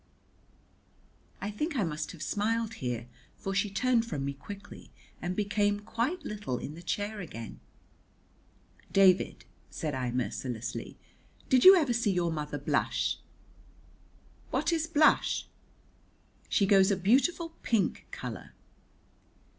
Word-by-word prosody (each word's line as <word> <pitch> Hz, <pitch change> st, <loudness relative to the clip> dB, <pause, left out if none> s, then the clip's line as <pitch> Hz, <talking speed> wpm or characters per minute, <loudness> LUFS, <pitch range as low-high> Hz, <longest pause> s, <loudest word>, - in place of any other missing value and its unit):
I 205 Hz, -, -3 dB
think 300 Hz, +9 st, -3 dB
I 235 Hz, -, +2 dB
must 150 Hz, -3 st, -3 dB
have 170 Hz, -, -8 dB
smiled 225 Hz, +2 st, 0 dB
here, 120 Hz, -2 st, -3 dB, 0.3 s
for 195 Hz, -, -4 dB
she 200 Hz, +1 st, +1 dB
turned 235 Hz, +4 st, +2 dB
from 150 Hz, -12 st, -4 dB
me 140 Hz, -, -2 dB
quickly, 200 Hz, +9 st, -10 dB, 0.3 s
and 180 Hz, +1 st, -2 dB
became 205 Hz, 0 st, +1 dB
quite 235 Hz, -, -2 dB
little 205 Hz, -12 st, -3 dB
in 145 Hz, -, -6 dB
the 165 Hz, -, -10 dB
chair 205 Hz, +5 st, -3 dB
again. 115 Hz, -, -8 dB, 1.3 s
"David," 190 Hz, -1 st, +4 dB, 0.2 s
said 155 Hz, -2 st, -3 dB
I 130 Hz, -2 st, -1 dB
mercilessly, 120 Hz, -1 st, -4 dB, 0.5 s
"did 255 Hz, -1 st, +5 dB
you 380 Hz, +1 st, +12 dB
ever 300 Hz, -9 st, +2 dB
see 235 Hz, -2 st, +1 dB
your 175 Hz, -2 st, +1 dB
mother 150 Hz, -2 st, -3 dB
blush?" 145 Hz, -, 0 dB, 1.3 s
"What -, -, +1 dB
is 320 Hz, -1 st, 0 dB
blush?" 315 Hz, -2 st, +3 dB, 1.0 s
"She 200 Hz, -, +3 dB
goes 195 Hz, -1 st, +5 dB
a 200 Hz, -, +2 dB
beautiful 275 Hz, -, +2 dB
pink 225 Hz, -4 st, 0 dB
colour." -, -, -7 dB
200 Hz, 125 wpm, -30 LUFS, 150-230 Hz, 1.3 s, you